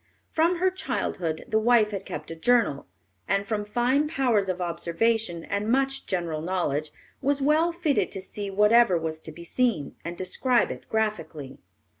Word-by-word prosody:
From 335 +3 +2
her 370 +2 +2
childhood 170 - -3
the 220 - +2
wife 220 -1 +4
had 195 -2 -5
kept 155 +2 -6
a - - -5
journal, 210 - +2 0.4
and 200 0 +1
from 210 0 -2
fine 250 +7 +1
powers 245 -10 +1
of 185 0 -2
observation 175 +2 0
and 205 +2 -2
much 270 +1 0
general 170 -4 -2
knowledge 155 -4 -1 0.3
was 280 +1 +1
well 305 +5 +3
fitted 335 -4 0
to 190 - -4
see 200 +1 -5
whatever 210 0 +5
was 160 -1 -3
to 160 - -9
be 170 +2 -11
seen, 200 - 0
and 170 +1 -6
describe 235 +7 +1
it - - -9
graphically. 210 -11 -3
210 Hz, 165 wpm, -26 LUFS, 170-250 Hz, 0.4 s, whatever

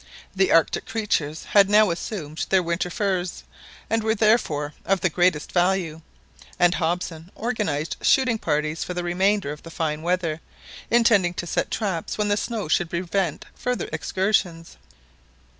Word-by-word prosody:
The 190 0 +2
Arctic 165 -1 +3
creatures 180 -9 -1
had 200 -1 +4
now 210 -2 +5
assumed 170 -3 -4
their 190 -1 +3
winter 170 +1 -1
furs, 185 -2 -2 0.4
and 225 0 +1
were 220 0 +1
therefore 180 -10 +2
of 195 0 +1
the 185 - +1
greatest 175 -3 +1
value, 175 -3 +1 0.6
and 175 0 +4
Hobson 170 -1 -2
organised 205 -11 -2
shooting 250 -4 +3
parties 155 -1 -1
for 180 - -5
the 175 - -2
remainder 190 -1 +1
of 150 - -8
the 165 - -11
fine 155 -2 -2
weather, 170 -2 -1 0.5
intending 215 -7 +4
to 175 - -4
set 170 - -1
traps 190 -7 -2
when 210 -1 0
the 205 - +3
snow 220 -3 -3
should 165 +2 +1
prevent 180 -1 -2
further 250 0 -3
excursions. 185 -4 -1
180 Hz, 150 wpm, -24 LUFS, 165-205 Hz, 0.6 s, now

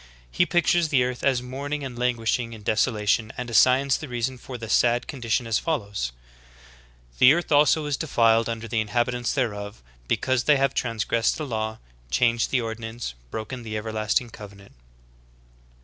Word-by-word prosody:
He 175 - +2
pictures 175 -1 +2
the 130 -4 +3
earth 125 0 -4
as 130 -3 +2
mourning 140 +3 -4
and 130 -3 -6
languishing 120 -1 -1
in 110 -2 -11
desolation 110 0 +1
and 125 -1 -5
assigns 130 +3 +4
the 155 - -7
reason 125 +1 -3
for 125 +1 -8
the 115 -1 -7
sad 120 +2 +2
condition 120 -3 -2
as 115 -1 +1
follows: 100 - -2 1.1
"The 125 - +8
earth 175 -1 -3
also 150 +1 +4
is 145 -2 -1
defiled 115 -6 +2
under 115 0 -4
the 110 0 0
inhab 120 +3 0
itants 120 +1 -2
thereof; 105 - -3 0.2
because 130 - 0
they 150 -2 +5
have 135 0 +1
transgressed 115 0 0
the 155 - -4
laws, 110 -3 -3 0.3
changed 115 - +2
the 130 - +1
ordinance, 115 - -5 0.2
broken 110 - -6
the 110 -2 -5
everlasting 110 +2 -1
covenant." 100 -2 -12
120 Hz, 165 wpm, -25 LUFS, 110-130 Hz, 1.1 s, The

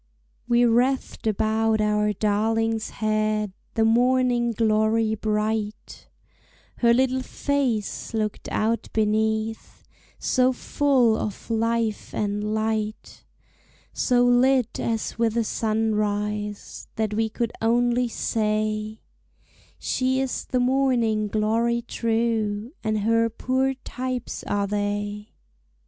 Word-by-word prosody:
We 240 0 +4
wreathed 245 +1 +1
about 220 +1 +1
our 210 0 +2
darling's 220 +2 0
head 215 -1 -1 0.2
The 225 - +3
morning 245 +1 +3
glory 220 0 +2
bright; 215 0 -3 0.7
Her 235 -1 +4
little 260 +1 +2
face 260 -6 -2
looked 215 -2 -3
out 225 +2 0
beneath 220 +1 -1 0.3
So 255 0 +2
full 255 -3 +2
of 215 +1 -5
life 230 -1 -1
and 205 0 -1
light, 215 0 -3 0.7
So 245 -1 +2
lit 250 0 +3
as 225 -1 -2
with 230 -1 +1
a 230 - +3
sunrise, 210 -2 -2
That 215 -1 -1
we 220 +1 0
could 235 +1 -3
only 240 +2 +2
say, 215 -1 -1 0.8
"She 260 0 0
is 265 -1 -2
the 255 - -1
morning 245 -4 +2
glory 225 +3 +1
true, 225 -1 -1
And 215 -1 0
her 230 +2 +2
poor 260 +3 0
types 255 -1 -5
are 205 0 0
they." 205 +1 -3
225 Hz, 105 wpm, -24 LUFS, 215-240 Hz, 0.8 s, We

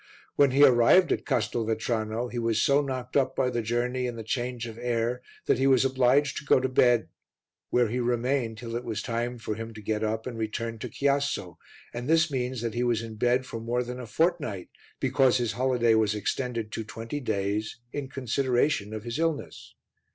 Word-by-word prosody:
When 140 -1 +5
he 135 +3 +4
arrived 135 +7 +6
at - - -1
Castelvetrano 110 +1 -1
he 120 - -4
was 115 -1 +1
so 140 +4 +4
knocked 130 -3 -5
up 135 -2 +2
by 130 -1 +1
the 120 -1 -1
journey 125 +3 -1
and 120 -1 -5
the 115 - -6
change 120 +1 -3
of 115 0 -8
air 120 0 -1 0.2
that - - +2
he 135 - +3
was 135 -1 +4
obliged 135 +2 +2
to - - -5
go 145 - +4
to 130 - 0
bed, 120 -2 +3 0.6
where 120 -1 +3
he 120 +4 -2
remained 120 -1 0
till 115 0 -6
it 120 - -3
was 110 -3 -4
time 120 +1 -2
for 110 -2 -4
him 115 +1 -7
to - - -8
get 110 +1 -1
up 110 +1 -1
and 120 -3 -5
return 115 +1 -3
to - - -5
Chiasso, 140 - -1 0.4
and 120 +3 -5
this 165 0 +4
means 125 -2 -2
that 115 -2 -2
he 120 +1 0
was 120 -2 +1
in 115 -1 -7
bed 125 +4 +1
for 115 - -6
more 120 +2 -1
than 125 +1 -6
a 125 - -7
fortnight, 145 - -1 0.3
because 130 -1 +3
his 120 -3 0
holiday 120 -1 +2
was 110 -1 +2
extended 115 +1 -2
to 110 - -4
twenty 115 +5 -6
days 105 -3 -2 0.2
in 140 -2 -4
consideration 125 -4 0
of 110 - -6
his 120 +5 -4
illness. 165 -2 -3
120 Hz, 205 wpm, -27 LUFS, 115-130 Hz, 0.6 s, arrived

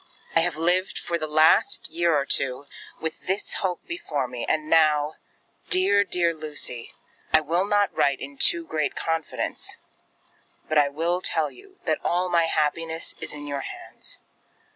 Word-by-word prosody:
I - - +7
have 165 -1 +1
lived 180 +3 +1
for 170 0 -2
the 155 - -3
last 155 +1 +4
year 170 0 +2
or 140 - 0
two 135 0 0 0.3
with 160 0 -5
this 190 +3 -1
hope 180 -3 -2
before 155 - -3
me; 125 -1 -5
and 155 -1 0
now 155 -1 +3 0.5
Dear, 200 +2 +5
dear 175 -3 +1
Lucy, 150 -6 -4 0.4
I 155 - +6
will 170 +5 +1
not 205 -1 +2
write 140 -1 +2
in 140 0 -8
too 340 -1 +3
great 155 - -1
confidence; 165 -1 -2 0.9
but 155 -1 +3
I 145 -1 +4
will 170 +5 -1
tell 160 -4 +1
you 390 0 -17
that 155 -2 0
all 180 +1 +1
my 170 -1 +3
happiness 160 +1 -1
is - - -3
in 145 -1 -7
your 140 -1 -3
hands. - - -7
160 Hz, 165 wpm, -25 LUFS, 150-175 Hz, 0.9 s, I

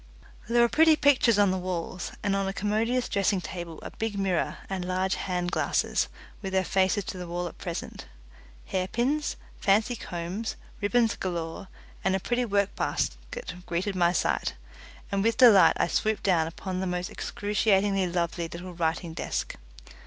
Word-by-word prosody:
There 240 0 +5
were - - +5
pretty 320 +5 +5
pictures 275 -7 +4
on 200 -2 +4
the 190 - -1
walls, 180 0 -4
and 200 -1 +1
on 195 0 0
a 195 - -2
commodious 225 +5 0
dressing 200 0 +1
table 175 -2 -6
a - - -6
big 220 -2 -3
mirror 190 -4 0
and 190 -2 -3
large 185 +1 0
hand 180 -1 -2
glasses, - - +1 0.3
with 190 -2 -5
their 190 -1 +2
faces 190 +2 +2
to 185 - -6
the 180 - -6
wall 175 +1 -2
at - - -11
present. 170 -2 -6 0.6
Hairpins, 240 +11 0 0.2
fancy 215 +5 +3
combs, 180 +3 -4 0.3
ribbons 225 +2 +2
galore, 175 +1 -4 0.4
and 190 0 +2
a - - 0
pretty 245 +5 0
work 200 -2 +1
basket - - -3
greeted 185 +3 -1
my 175 -1 +4
sight, 175 - 0 0.6
and 200 0 +1
with 230 0 +2
delight 230 -7 +7
I - - +4
swooped 215 +4 0
down 170 -5 +3
upon 185 +3 -5
the 190 - -1
most 180 0 -2
excruciatingly 200 -2 +1
lovely 170 -1 -1
little 175 +2 -8
writing 165 0 -1
desk. - - -3
190 Hz, 165 wpm, -27 LUFS, 180-215 Hz, 0.6 s, delight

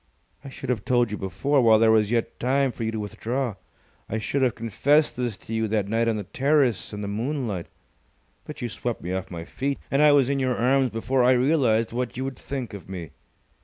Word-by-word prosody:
I 140 - -8
should 130 -1 -4
have 110 -5 -2
told 120 -3 +2
you 105 - -3
before, 135 +10 +1
while 110 -2 +6
there 110 0 +5
was 110 -2 +3
yet 115 -1 -1
time 135 +1 +2
for 115 - -6
you 110 - 0
to 110 - -2
withdraw. 115 +4 -3 0.6
I 110 - -1
should 135 +5 -1
have 125 -3 +2
confessed 140 +7 +2
this 120 -5 -3
to 115 - -9
you 110 0 0
that 105 -2 0
night 115 +2 +1
on 110 -1 +1
the 105 - -4
terrace 135 - +1
in 105 -1 -6
the 100 - -4
moonlight. 110 - -3 0.8
But - - -8
you - - 0
swept 120 +1 -4
me 90 +2 -3
off 95 0 -3
my 85 -2 -6
feet, 140 +7 -3
and 135 - +3
I 150 -1 +7
was 140 -3 +4
in 140 0 0
your 130 -2 0
arms 130 +2 +3
before 120 +3 0
I 125 +1 +6
realized 125 -4 +2
what 125 0 -3
you 130 - -2
would 135 -2 -6
think 130 -7 -5
of 100 -2 -9
me. 85 -6 -6
120 Hz, 230 wpm, -25 LUFS, 110-135 Hz, 0.8 s, I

